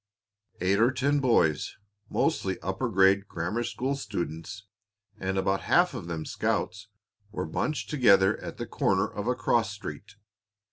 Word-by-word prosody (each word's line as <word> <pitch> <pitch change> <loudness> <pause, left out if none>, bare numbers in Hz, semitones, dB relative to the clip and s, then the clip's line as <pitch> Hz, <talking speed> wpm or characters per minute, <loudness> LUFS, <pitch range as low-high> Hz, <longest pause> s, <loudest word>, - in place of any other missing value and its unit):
Eight 95 +3 +2
or 115 +3 +5
ten 140 +2 +1
boys, 115 - +2 0.3
mostly 95 -1 0
upper 95 +7 -2
grade 95 -1 +4
grammar 90 +8 -2
school 130 +3 -2
students 100 - -5 0.6
and 95 +1 -2
about 95 0 +1
half - - +3
of 85 - -6
them 80 -2 -4
scouts, 105 +1 -2 0.4
were 105 - -3
bunched 145 - -2
together 105 -8 +5
at - - -7
the - - -4
corner - - +1
of 105 +2 -6
a 125 - +2
cross 115 -5 +1
street. 100 0 -8
100 Hz, 145 wpm, -28 LUFS, 95-120 Hz, 0.6 s, or